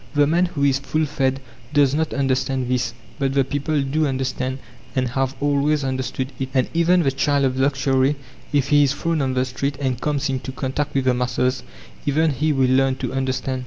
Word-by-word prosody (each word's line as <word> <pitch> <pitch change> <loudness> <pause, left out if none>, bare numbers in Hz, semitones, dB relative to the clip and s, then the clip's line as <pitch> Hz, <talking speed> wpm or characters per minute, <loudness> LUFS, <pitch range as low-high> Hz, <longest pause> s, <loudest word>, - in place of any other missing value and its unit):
The 145 0 +5
man 170 +5 +2
who 145 -5 -3
is 135 -1 +3
full 155 +3 -1
fed 135 -2 -1 0.3
does 145 -2 +4
not 160 +1 0
understand 135 -1 0
this, 125 -1 -1 0.2
but 135 -1 0
the 135 - +4
people 145 +2 -1
do 150 +3 0
understand, 130 -1 -2 0.4
and 130 -2 +1
have 135 +1 -1
always 145 +1 +1
understood 130 0 -3
it; 130 -1 -2
and 130 - +3
even 170 +1 +3
the 135 - +2
child 140 +1 +1
of 130 0 0
luxury, 135 0 +2 0.4
if 140 -2 +1
he 145 0 +5
is 140 -1 +3
thrown 165 +1 -1
on 130 -1 -1
the 130 0 +2
street 135 +2 -3
and 130 -3 -1
comes 145 -1 0
into 130 -1 -3
contact 140 +3 -3
with 135 -1 +1
the 130 - +4
masses, 125 +1 0 0.5
even 155 +2 +3
he 150 +3 0
will 130 -3 +2
learn 135 0 +3
to - - -4
understand. 130 0 -1
135 Hz, 200 wpm, -22 LUFS, 130-145 Hz, 0.5 s, The